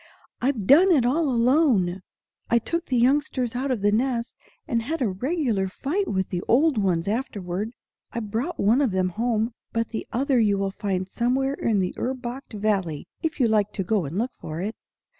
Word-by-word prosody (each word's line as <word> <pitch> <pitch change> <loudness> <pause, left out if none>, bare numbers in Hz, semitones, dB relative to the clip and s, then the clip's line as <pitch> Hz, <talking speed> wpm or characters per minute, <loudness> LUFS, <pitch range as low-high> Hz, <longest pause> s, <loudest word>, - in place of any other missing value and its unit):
"I've 245 -6 0
done 340 - +7
it 275 -8 +4
all 295 +4 +2
alone. 235 - +3 0.5
I 235 - +4
took 335 +9 -2
the 255 - +1
youngsters 255 -1 +1
out 265 +3 -1
of 250 -6 -1
the 205 - +4
nest, 235 +1 0 0.3
and 230 -1 0
had 310 +8 -3
a 250 - +1
regular 230 - 0
fight 305 - -2
with 190 -1 -1
the 175 - -2
old 275 0 +4
ones 180 -4 +1
afterward. 205 -3 -2 0.4
I 235 - -3
brought 230 +10 -3
one 230 +7 +4
of 270 - +3
them 185 -1 0
home; 225 +3 -1 0.2
but 230 -1 -1
the 225 - -5
other 265 +1 +2
you 205 -3 +3
will 195 0 -1
find 190 -2 -2
somewhere 255 +6 0
in 220 -7 +1
the 180 - -1
Urbacht 255 0 -4
Valley, 200 -7 -1 0.2
if 320 -2 -2
you 245 - +4
like 210 -2 +2
to 195 - -2
go 200 -2 0
and 150 +6 -5
look 240 +5 0
for 155 +1 -6
it." 210 +5 -3
230 Hz, 195 wpm, -25 LUFS, 200-265 Hz, 0.5 s, done